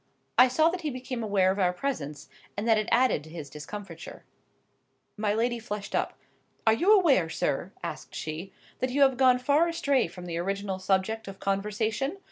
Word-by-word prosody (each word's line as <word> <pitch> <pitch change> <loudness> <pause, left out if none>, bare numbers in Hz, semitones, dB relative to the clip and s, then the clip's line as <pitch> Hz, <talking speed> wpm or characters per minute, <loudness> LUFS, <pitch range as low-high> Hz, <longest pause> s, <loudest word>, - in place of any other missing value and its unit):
I 250 - +8
saw 310 +6 +3
that 360 +1 -4
he 310 - -2
became 255 -2 -5
aware 200 -4 +2
of 195 - -3
our 180 -2 +3
presence, 155 - -4 0.3
and 210 +3 -2
that 220 -2 +5
it 215 - -2
added 250 - +3
to 160 - -13
his 155 -4 -8
discomfiture. 165 +3 -8 0.9
My 210 -1 0
lady 240 +1 0
flushed 210 -3 -6
up. - - -1 0.5
"Are 220 - +6
you 350 - +3
aware, 305 - +5
sir," - - -1
asked - - -6
she, 160 +5 -5 0.3
"that 255 - 0
you 280 +3 +3
have 265 -1 +4
gone 255 -1 +5
far 285 +6 +3
astray 285 - +1
from 180 +1 -10
the 170 -1 -3
original 195 +1 -2
subject 190 +4 0
of 195 0 -8
conversation? 215 - -1
215 Hz, 185 wpm, -28 LUFS, 190-255 Hz, 0.9 s, I